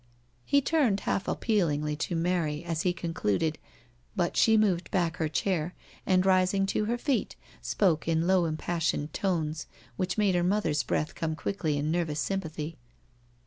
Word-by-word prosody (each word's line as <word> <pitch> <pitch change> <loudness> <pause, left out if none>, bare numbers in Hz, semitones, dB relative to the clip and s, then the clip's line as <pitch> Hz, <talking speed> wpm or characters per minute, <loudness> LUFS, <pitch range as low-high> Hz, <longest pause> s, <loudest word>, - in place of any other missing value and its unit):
*^ - - -35 0.4
He 280 - +3
turned 265 -9 +2
half 195 - -1
appealingly 150 -9 0
to 170 - -2
Mary 165 -2 0
as 165 -1 -1
he 180 - +2
concluded, 165 - -1 0.6
but 175 -2 0
she 220 -1 +5
moved 190 -5 +2
back 170 -3 0
her 160 -3 -1
chair^ 175 +1 -1 0.3
and 185 -1 +3
rising 190 +1 +3
to 215 - +1
her 235 +3 0
feet 260 0 -1 0.3
spoke 170 -7 +1
in 165 0 +2
low 185 -1 +3
impassioned 160 -1 -1
tones, 160 -5 -1 0.3
which 185 +1 -1
made 205 -3 +3
her 175 - +2
mother's 175 -6 +1
breath 150 +4 -1
come 160 -1 -2
quickly 160 -4 -2
in 150 +2 -1
nervous 165 -3 -1
sympathy. 160 -4 -3
175 Hz, 160 wpm, -28 LUFS, 155-195 Hz, 0.6 s, she